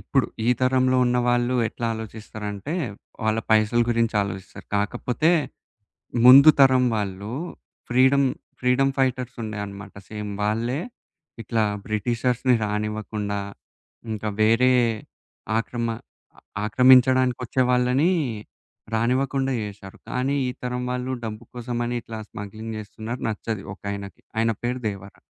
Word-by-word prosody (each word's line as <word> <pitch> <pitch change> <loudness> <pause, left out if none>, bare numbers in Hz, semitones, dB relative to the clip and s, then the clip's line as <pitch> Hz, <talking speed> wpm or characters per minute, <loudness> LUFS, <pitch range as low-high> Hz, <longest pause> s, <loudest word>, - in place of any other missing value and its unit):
ఇప్పుడు 135 -2 +1 0.2
ఈ - - +3
తరంలో 130 0 +3
ఉన్న 125 0 +2
వాళ్ళు 120 +1 +2
ఎట్ల 120 - -9
ఆలోచిస్తారంటే, 110 - -6 0.5
వాళ్ళ 110 0 +1
పైసల 110 +2 +4
గురించి 115 -1 +1
ఆలోచిస్తారు. 95 0 -7
కాకపోతే 120 - 0 1.0
ముందు 140 +4 +10
తరం 130 -1 +6
వాళ్ళు 100 +1 -3 0.6
ఫ్రీడమ్ 130 +2 +4 0.3
ఫ్రీడమ్ 130 +2 +2
ఫైటర్స్ 130 -1 0
ఉండేన్నమాట 105 -2 -6
సేమ్ 105 -1 -5
వాళ్ళే 115 +6 0 0.6
ఇట్లా 110 +1 0 0.2
బ్రిటిషర్స్‌ని 120 +3 +1
రానివ్వకుండా, 105 -1 -3 0.7
ఇంకా 110 0 -3
వేరే 120 +4 +5 0.8
ఆక్రమ 115 +1 -2 0.5
అ - - -15 0.3
ఆక్రమించడానికొచ్చే 130 +1 +4
వాళ్ళని 125 +6 +3 0.9
రానివ్వకుండా 135 +3 +1
జేశారు. 100 -2 -8
కానీ, 130 +3 0
ఈ - - -2
తరం 125 0 -2
వాళ్ళు 125 +1 -2
డబ్బు 110 +1 -6
కోసమని 120 0 -3
ఇట్లా 115 - -7
స్మగ్లింగ్ 110 +2 -7
చేస్తున్నారు 110 +3 -7
నచ్చదు 110 -1 -4
ఒకాయనకి. 100 0 -7 0.2
ఆయన 115 0 +3
పేరు 125 +1 -1
దేవర. 100 -1 -9
115 Hz, 110 wpm, -24 LUFS, 105-125 Hz, 1.0 s, ముందు